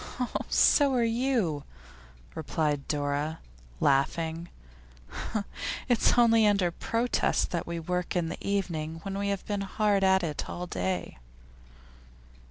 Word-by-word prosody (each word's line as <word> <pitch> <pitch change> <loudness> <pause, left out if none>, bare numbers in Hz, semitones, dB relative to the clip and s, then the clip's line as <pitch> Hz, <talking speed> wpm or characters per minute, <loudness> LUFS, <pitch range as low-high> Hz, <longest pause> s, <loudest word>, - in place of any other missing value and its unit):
'So 280 -3 +4
are 240 - +3
you,' 230 - 0 0.7
replied 150 - -1
Dora, 145 +2 -1 0.4
laughing. 160 +5 +1 1.4
'It's 245 -1 +3
only 230 -2 +5
under 200 -4 +2
protest 230 +7 0
that 170 - -2
we 170 0 -3
work 180 +2 -2
in 175 -2 +1
the - - -5
evening 170 -6 -2
when 195 -1 -4
we 200 0 -1
have 200 -1 -2
been 205 -1 -2
hard 200 0 +1
at 190 -1 +4
it 155 -3 -3
all 180 - -4
day. 90 - -3
180 Hz, 120 wpm, -28 LUFS, 155-210 Hz, 1.4 s, only